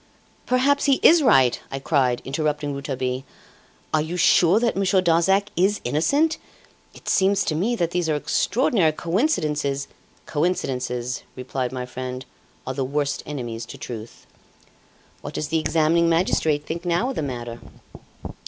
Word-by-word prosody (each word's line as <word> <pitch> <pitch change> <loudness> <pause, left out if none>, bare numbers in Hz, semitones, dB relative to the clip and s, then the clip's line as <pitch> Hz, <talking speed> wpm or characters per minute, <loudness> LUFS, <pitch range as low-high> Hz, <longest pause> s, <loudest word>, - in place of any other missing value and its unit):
"Perhaps 260 +3 +2
he 275 -2 +3
is 335 +1 +7
right," 130 - +4
I 135 - -3
cried, 135 -3 +1
interrupting 150 +1 -1
Rouletabille. 130 -2 -3 0.7
"Are 155 - +3
you 165 +4 -4
sure 180 +3 +5
that 235 0 0
Monsieur 195 0 +2
Darzac 185 +4 +2
is 195 +3 +2
innocent? 280 - +1 0.6
It - - -15
seems 195 0 +3
to - - 0
me 205 +10 0
that 170 -6 -1
these 175 -2 -1
are 155 - +2
extraordinary 190 - +1
coincidences 150 - -1 0.2
" - - -33
"Coincidences," 130 -6 -2
replied 130 0 -3
my 125 -1 -4
friend, 125 0 -6 0.4
"are 130 - -3
the 135 - -2
worst 140 +2 -1
enemies 120 -6 -5
to - - -9
truth." 115 -1 -9 1.0
"What - - -8
does 150 - -3
the 160 +1 +1
examining 160 +2 +2
magistrate 160 -3 +1
think 170 +1 -5
now 175 +9 0
of - - -7
the - - -2
matter?" 120 -4 -5
155 Hz, 150 wpm, -23 LUFS, 130-185 Hz, 1.0 s, is